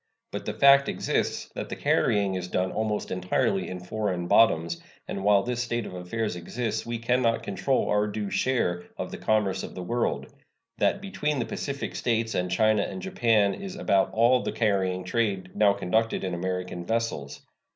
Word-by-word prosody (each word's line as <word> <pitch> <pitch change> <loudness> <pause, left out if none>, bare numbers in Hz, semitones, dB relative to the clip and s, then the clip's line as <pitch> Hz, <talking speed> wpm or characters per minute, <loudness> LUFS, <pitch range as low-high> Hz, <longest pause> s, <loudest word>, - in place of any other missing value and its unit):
But - - -5
the - - -2
fact 140 0 +6
exists - - -1
that - - -5
the - - -4
carrying 100 -2 +2
is 90 -1 -3
done 90 +1 -1
almost 110 -1 -2
entirely 90 +1 0
in 90 - -5
foreign 90 -1 -2
bottoms, 85 -6 +3 0.3
and 95 - -4
while 100 -1 +5
this 120 +1 -2
state 120 -2 -2
of - - -8
affairs 90 +3 -3
exists 110 +6 -3
we 120 0 -2
can 125 +2 +1
not 115 -2 +1
control 100 +7 0
our 105 0 +2
due 105 -1 -4
share 90 -9 0
of - - -4
the - - -7
commerce 100 -3 +1
of - - -8
the 90 - -5
world; 120 +6 -2 0.5
that 200 - +2
between 150 -7 -2
the 120 - -1
Pacific 140 -1 -4
States 115 -1 0
and 90 0 -1
China 110 +3 +3
and 185 - -4
Japan 115 - +2
is 195 -1 -7
about 100 - +2
all 120 +3 +4
the - - -2
carrying 95 -4 0
trade 95 -2 -1
now 105 -2 +5
conducted 110 +3 0
in 95 -2 -2
American 90 0 -3
vessels. 115 -9 -2
105 Hz, 180 wpm, -27 LUFS, 90-115 Hz, 0.5 s, fact